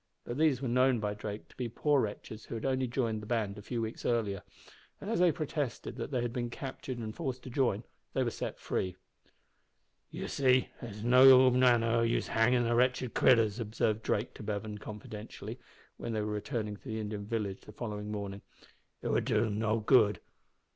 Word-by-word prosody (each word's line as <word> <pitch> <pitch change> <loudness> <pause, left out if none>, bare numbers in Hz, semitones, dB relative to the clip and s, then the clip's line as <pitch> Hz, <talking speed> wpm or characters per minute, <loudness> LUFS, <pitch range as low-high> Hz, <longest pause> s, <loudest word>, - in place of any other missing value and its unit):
But 120 +4 -5
these 145 -4 +3
were - - 0
known 125 0 +3
by 105 -1 -1
Drake 105 0 -6
to - - -19
be 125 -2 -3
poor 145 +4 +2
wretches 110 +1 -5
who - - -6
had 110 - -4
only 130 -1 +1
joined 115 -3 -1
the 105 - -9
band 110 -4 -1
a 105 - -9
few 115 +2 -3
weeks 110 +1 -5
before, 110 -5 0 0.6
and 205 - -5
as 230 - +1
they 180 -1 +5
protested 150 -6 -3
that - - -4
they 125 -4 -1
had 120 -1 -2
been 120 -2 -2
captured 130 0 -6
and 110 -2 -5
forced 130 -6 -4
to 130 - -8
join, 120 -5 +1 0.3
they - - +2
were - - -1
set - - -5
free. 90 -1 -2 1.1
"You - - -5
see, 130 -2 +3
it's 110 -4 -7
of - - -5
no 130 +1 +8
manner 125 -2 +4
o' 115 0 +2
use 115 0 +1
hangin' 120 +2 +3
the 120 0 +1
wretched 125 0 +2
critters," 115 -4 +4
observed 110 -1 0
Drake 105 +1 -1
to - - -11
Bevan, 105 0 -4
confidentially, 105 +1 -8 0.4
when 115 - -4
they 110 - 0
were 105 0 -2
returning 105 -1 -3
to - - -28
the 110 0 -4
Indian 105 -1 -4
village 105 -4 -2
the - - -12
following 105 -3 -5
morning. 100 -1 -5 0.6
"It - - -1
would - - +1
do - - +2
them 105 -2 -1
no 110 0 +1
good. 105 -2 +4
115 Hz, 205 wpm, -31 LUFS, 105-125 Hz, 1.1 s, no